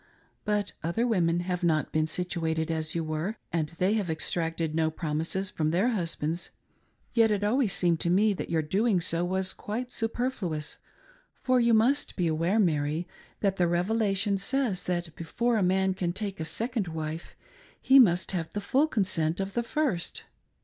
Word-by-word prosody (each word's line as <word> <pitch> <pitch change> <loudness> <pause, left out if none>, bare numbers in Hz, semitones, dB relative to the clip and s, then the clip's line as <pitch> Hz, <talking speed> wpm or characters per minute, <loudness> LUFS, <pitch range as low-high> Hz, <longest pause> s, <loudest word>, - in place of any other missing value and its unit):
But 210 -1 0
other 170 +9 0
women 175 -7 +2
have 180 0 -2
not 155 -3 +1
been 155 0 +1
situated 160 -2 -1
as 160 0 -2
you 165 - 0
were, 155 +7 -3 0.2
and 160 -3 0
they 180 +5 0
have 205 -5 -1
exacted 165 0 -2
no 160 0 +2
promises 160 +4 -2
from 155 -1 0
their 185 +9 +2
husbands. 170 -5 -2 0.6
Yet 225 -1 +4
it 205 -1 0
always 225 +1 +2
seemed 175 -3 +2
to 170 - +1
me 205 +4 +4
that 185 - -5
your 160 -2 +1
doing 195 +5 +2
so 170 0 +1
was 190 +1 0
quite 245 +4 -5
superfluous, 225 -11 -3 0.6
for 255 -1 +3
you 235 -1 +4
must 250 +6 +2
be 180 - 0
aware, 165 +5 +1
Mary, 160 -3 +1 0.3
that 195 -2 +1
the 175 - +3
Revelation 195 +2 +1
says 225 -2 -1
that 175 -3 -2
before 235 +8 0
a - - +1
man 190 +1 +2
can 180 -2 -2
take 200 -1 -4
a 160 - -2
second 230 +2 -2
wife 160 0 -5 0.4
he 270 +1 +6
must 180 -7 +4
have 170 -4 -3
the 205 - -2
full 265 +9 +2
consent 175 - +1
of 195 0 -3
the 240 - +1
first. 235 - -2
180 Hz, 175 wpm, -28 LUFS, 165-215 Hz, 0.6 s, he